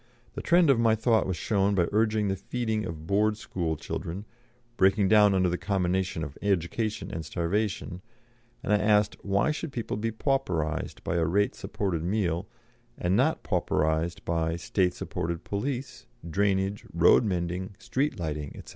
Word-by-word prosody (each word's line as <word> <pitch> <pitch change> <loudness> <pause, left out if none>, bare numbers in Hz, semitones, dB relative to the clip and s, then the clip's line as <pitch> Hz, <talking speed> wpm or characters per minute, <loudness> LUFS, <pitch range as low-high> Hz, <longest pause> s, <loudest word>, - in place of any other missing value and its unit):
The - - -5
trend 170 -3 +5
of 125 - +2
my 115 -1 +4
thought 110 -1 +2
was 95 -3 -2
shown 100 +2 +1
by 90 -3 +3
urging 110 0 +2
the 95 - 0
feeding 110 +2 -2
of 80 -2 -6
Board 105 +3 +2
School 85 -6 -3
children, 90 +6 -5 0.5
breaking 95 -1 +3
down 105 -2 +6
under 95 -1 +3
the 90 0 -1
combination 95 -3 0
of 75 -3 -7
education 100 +3 -1
and 80 - -4
starvation, 90 +3 -2 0.6
and 105 - +1
I - - +6
asked, 105 0 +3
"Why 100 +9 +2
should 155 0 -4
people 115 -5 -3
be 115 +2 -1
pauperised 110 - -1
by 85 - -1
a 85 - +2
rate 100 +5 +2
supported 95 -6 -3
meal, 90 -3 0 0.5
and 90 +2 +1
not - - +2
pauperised 80 +2 0
by, 80 -1 0
state 90 +1 0
supported 85 0 -4
police, 125 +4 -4 0.2
drainage, 100 +2 0
road 85 +7 +5
mending, 90 -1 -2
street 140 +4 -1
lighting, 75 -3 -4
&c? - - -12
95 Hz, 160 wpm, -28 LUFS, 85-110 Hz, 0.6 s, down